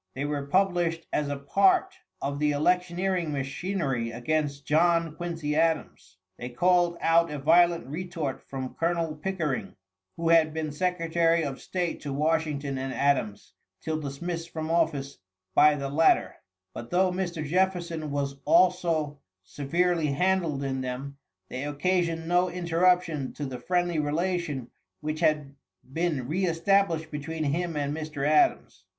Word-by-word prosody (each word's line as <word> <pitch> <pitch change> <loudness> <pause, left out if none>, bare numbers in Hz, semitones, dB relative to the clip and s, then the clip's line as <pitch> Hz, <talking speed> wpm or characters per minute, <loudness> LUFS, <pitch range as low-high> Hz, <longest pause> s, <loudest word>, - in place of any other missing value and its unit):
They 135 +2 -2
were 145 -1 -3
published 175 -1 +1
as 150 - 0
a 145 0 -3
part 370 - +3 0.3
of 140 +1 -2
the 150 0 +2
electioneering 180 +2 0
machinery 135 -3 -2
against 140 +4 -2
John 165 0 +2
Quincy 165 -4 -3
Adams. 160 0 -1 0.2
They 125 - -5
called 175 +6 +2
out 170 +1 +4
a 150 - -4
violent 170 +3 +4
retort 160 -1 -4
from 130 -1 -6
Colonel 165 -2 -1
Pickering, 150 - -3 0.4
who 165 0 0
had 160 -2 +4
been 155 -1 -2
secretary 165 0 +1
of 140 -3 -4
State 180 -2 -3
to 145 - -5
Washington 150 -2 0
and 135 0 -3
Adams, 135 -8 0 0.3
till 155 -1 -3
dismissed 165 +4 -5
from 160 -1 -4
office 150 - 0 0.3
by 150 +7 +6
the 140 -1 -4
latter; 155 +3 +3 0.4
but 120 - -8
though 185 +1 +2
Mr. 175 -4 -3
Jefferson 170 -2 0
was 140 -1 -2
also 165 -5 +2 0.2
severely 165 - 0
handled 165 -1 0
in 135 -1 -2
them, 130 +2 -5 0.3
they 130 +6 -5
occasioned 165 +2 0
no 180 +1 +3
interruption 175 -4 +1
to 145 - -5
the 130 -2 -6
friendly 175 +3 0
relation 150 -4 -2 0.3
which 155 0 -4
had 150 -4 +1 0.4
been 160 -6 -1
re 185 +6 0
established 165 -1 +1
between 155 +2 -4
him 165 +3 -1
and 145 0 -1
Mr. 155 -3 -3
Adams. 150 0 +2
160 Hz, 140 wpm, -27 LUFS, 140-175 Hz, 0.4 s, by